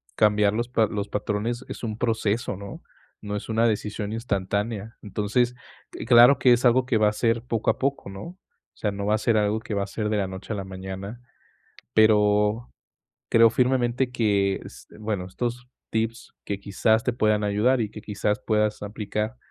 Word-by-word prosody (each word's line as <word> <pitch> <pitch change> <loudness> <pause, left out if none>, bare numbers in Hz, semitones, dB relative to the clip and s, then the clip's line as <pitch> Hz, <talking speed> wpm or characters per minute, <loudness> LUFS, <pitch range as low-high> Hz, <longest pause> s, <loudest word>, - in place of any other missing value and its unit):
cambiar 105 -1 +3
los 120 +2 -2
pa 115 -3 +3
los 100 -1 -4
patrones 110 +4 -2
es - - -7
un 110 -1 -3
proceso, 115 -2 -1
¿no?, 100 0 -9 0.4
no 105 0 -4
es 105 - -8
una 115 +1 +3
decisión 105 -1 -2
instantánea. 105 0 -2
Entonces, 110 +4 0 0.5
claro 120 +3 +7
que 125 - +6
es 120 - +1
algo 125 +1 +4
que 125 -4 +1
va 105 -1 +4
a - - -4
ser 115 +1 0
poco 115 -3 -1
a - - -9
poco, 135 -6 -2
¿no?, 95 0 -8
o 180 +2 -10 0.4
sea, 105 - -2
no 100 0 -4
va 105 - +3
a 110 - -1
ser 115 0 +1
algo 105 +1 +1
que 110 -1 -6
va 100 - 0
a - - -6
ser 105 +1 -3
de 110 - 0
la 100 -2 0
noche 95 +3 -6
a - - -3
la 95 - -4
mañana, 95 +4 -7 0.8
pero 105 +1 +3 0.6
creo 115 0 +6
firmemente 125 0 +1
que, 100 -4 +1
s - - -12
bueno, 105 -4 -3
estos 120 +5 -4 0.2
tips 115 +1 -3
que 100 -1 -3
quizás 110 +3 +1
te 125 - +1
puedan 110 -3 +1
ayudar 110 +6 +2
y 110 - 0
que 105 - -10
quizás 105 0 -1
puedas 105 -1 0
aplicar, 105 +2 -3
110 Hz, 190 wpm, -25 LUFS, 105-115 Hz, 0.8 s, claro